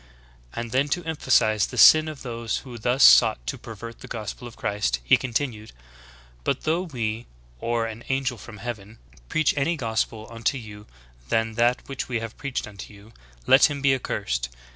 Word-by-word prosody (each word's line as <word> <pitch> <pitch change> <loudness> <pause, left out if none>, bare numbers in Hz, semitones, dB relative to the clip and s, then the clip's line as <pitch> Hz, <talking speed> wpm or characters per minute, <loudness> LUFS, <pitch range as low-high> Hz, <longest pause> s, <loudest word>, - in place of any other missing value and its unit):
And 115 -1 -4
then, 135 +3 +2
to 175 +4 -2
em 160 -1 -2
phasize 110 -7 +2
the - - -8
sin 155 0 +8
of 155 -3 -7
those 115 -3 -3
who 120 -3 -9
thus 125 +4 +2
sought - - +7
to - - -3
''pervert 115 +1 -9
the - - -11
gospel 110 +2 -6
of 120 - -12
Christ," 100 - -1
he 60 - +6
continued: 120 -3 -3 0.7
''But - - -1
though 160 +3 0
we, 120 -9 -4 0.3
or 115 -1 -1
an 115 +1 -7
angel 135 -3 -1
from 110 -3 -11
heaven, 110 -1 -7 0.3
preach 155 - +2
any 150 +4 +1
other - - -5
gospel 110 0 -2
unto 115 +4 -1
you 105 -3 -10 0.4
than 115 0 +1
that 120 +2 +1
which 135 -2 -5
we 120 -2 -1
have 115 0 -7
preached 140 -5 -4
unto 100 0 -10
you, 105 +2 -16 0.3
let 135 - +7
him 145 -1 -4
be 135 -1 +3
accursed. 65 - -2
115 Hz, 185 wpm, -25 LUFS, 110-135 Hz, 0.7 s, sin